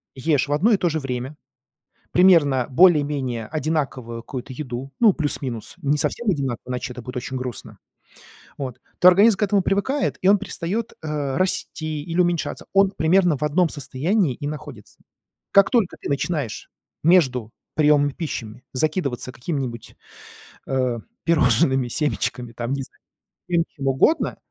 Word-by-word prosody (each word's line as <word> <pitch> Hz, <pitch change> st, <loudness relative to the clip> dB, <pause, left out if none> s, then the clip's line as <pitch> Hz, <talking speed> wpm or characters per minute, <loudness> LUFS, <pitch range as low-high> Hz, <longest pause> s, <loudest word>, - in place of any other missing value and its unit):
ешь 145 Hz, +1 st, +1 dB
в 145 Hz, -, -1 dB
одно 190 Hz, +11 st, +3 dB
и 210 Hz, -, +5 dB
то 175 Hz, -, +1 dB
же 160 Hz, 0 st, -1 dB
время 130 Hz, +1 st, -4 dB, 0.8 s
примерно 155 Hz, -9 st, +5 dB
более-менее 140 Hz, -8 st, +3 dB
одинаковую 135 Hz, -6 st, -3 dB
какую-то 130 Hz, +1 st, -7 dB
еду, 130 Hz, 0 st, -6 dB
ну, 225 Hz, -4 st, +6 dB
плюс-минус, 135 Hz, -7 st, -3 dB
не 145 Hz, +1 st, +1 dB
совсем 235 Hz, +6 st, 0 dB
одинаковую, 130 Hz, -5 st, -3 dB
иначе 125 Hz, 0 st, -4 dB
это 125 Hz, -, -9 dB
будет 125 Hz, +2 st, -8 dB
очень 130 Hz, +1 st, -4 dB
грустно. 125 Hz, -3 st, -6 dB, 0.8 s
Вот, 130 Hz, -3 st, -5 dB, 0.2 s
то 180 Hz, -, +7 dB
организм 200 Hz, +3 st, +6 dB
к -, -, 0 dB
этому 200 Hz, -1 st, +2 dB
привыкает, 200 Hz, +10 st, 0 dB
и 185 Hz, -, +2 dB
он 205 Hz, -, +6 dB
перестаёт, 205 Hz, +6 st, -4 dB
э, 150 Hz, -4 st, -3 dB
расти 155 Hz, -4 st, -1 dB
или 170 Hz, +2 st, -3 dB
уменьшаться. 175 Hz, -2 st, -1 dB
Он 195 Hz, 0 st, +4 dB
примерно 175 Hz, -1 st, +3 dB
в 150 Hz, -, -5 dB
одном 160 Hz, +3 st, +2 dB
состоянии 155 Hz, -, 0 dB
и 145 Hz, -, -5 dB
находится. 145 Hz, -8 st, -9 dB, 0.5 s
Как 200 Hz, 0 st, +6 dB
только 230 Hz, -8 st, +1 dB
ты -, -, -6 dB
начинаешь 140 Hz, -4 st, -2 dB, 0.3 s
между 130 Hz, -10 st, +3 dB, 0.2 s
приёмами 145 Hz, -2 st, +4 dB
пищами 125 Hz, -8 st, -6 dB
закидываться 140 Hz, -3 st, -1 dB
какими-нибудь, 130 Hz, -4 st, -5 dB, 0.7 s
э, 130 Hz, -3 st, 0 dB, 0.3 s
пирожными, 130 Hz, -4 st, +3 dB
семечками, 125 Hz, -3 st, -2 dB
там, 120 Hz, +2 st, -4 dB
не 140 Hz, -1 st, -2 dB
знаю, -, -, -15 dB, 0.5 s
всем 170 Hz, -2 st, +2 dB
чем 135 Hz, -3 st, -4 dB
угодно. 135 Hz, -, +2 dB
145 Hz, 145 wpm, -22 LUFS, 130-175 Hz, 0.8 s, то